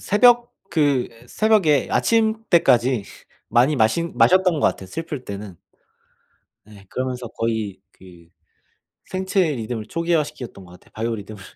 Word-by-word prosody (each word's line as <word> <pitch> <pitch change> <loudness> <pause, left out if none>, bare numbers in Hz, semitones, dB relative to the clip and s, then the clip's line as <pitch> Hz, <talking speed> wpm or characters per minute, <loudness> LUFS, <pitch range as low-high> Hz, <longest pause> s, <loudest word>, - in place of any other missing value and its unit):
새벽 240 +3 +4 0.2
그 145 -6 +1 0.2
새벽에 200 -11 +2
아침때까지 170 - +2 0.4
많이 125 +6 +3
마신 125 +8 +1
마셨던 180 +10 +4
것 - - +3
같아요, 95 - -3
슬플 155 - -6
때는. 100 -3 -8 1.1
예 100 -2 -15
그러면서 125 -2 -4
거의 110 -4 -3
그 85 -3 -17 0.8
생체 190 +1 -1
리듬을 110 -2 -5
초기화시켰던 150 - -3
것 90 - -16
같아요, 90 - -18
바이오 115 +1 -2
리듬을. 105 0 -10
130 Hz, 285 characters per minute, -22 LUFS, 110-170 Hz, 1.1 s, 새벽